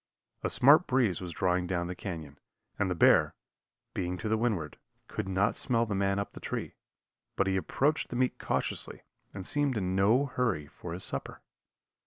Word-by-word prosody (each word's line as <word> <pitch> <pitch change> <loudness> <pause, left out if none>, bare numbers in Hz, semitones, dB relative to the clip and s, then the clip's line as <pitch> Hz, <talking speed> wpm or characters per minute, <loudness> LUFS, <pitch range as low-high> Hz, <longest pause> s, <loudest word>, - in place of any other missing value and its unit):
A - - -1
smart 145 +7 +6
breeze 120 -10 +1
was 90 -2 -5
drawing 90 0 0
down 85 -1 -1
the 90 - -4
canyon, 80 -7 -7 0.4
and 100 -2 +1
the 90 - -1
bear, - - +5 0.6
being 90 0 -2
to 110 - -4
the 110 - +2
windward, 110 -10 -1 0.3
could - - -4
not 95 +3 +1
smell 115 -3 +1
the 105 - -3
man 100 0 +1
up 100 - -3
the - - -9
tree, - - -4 0.6
but 100 - +2
he 95 0 0
approached 140 - 0
the - - -5
meat 125 +1 0
cautiously - - -1 0.3
and 95 -2 -7
seemed 145 -4 +2
in 95 -2 -1
no 110 +8 +4
hurry 120 - -1
for 85 +3 -9
his 90 - -2
supper. - - -4
95 Hz, 185 wpm, -30 LUFS, 90-120 Hz, 0.6 s, smart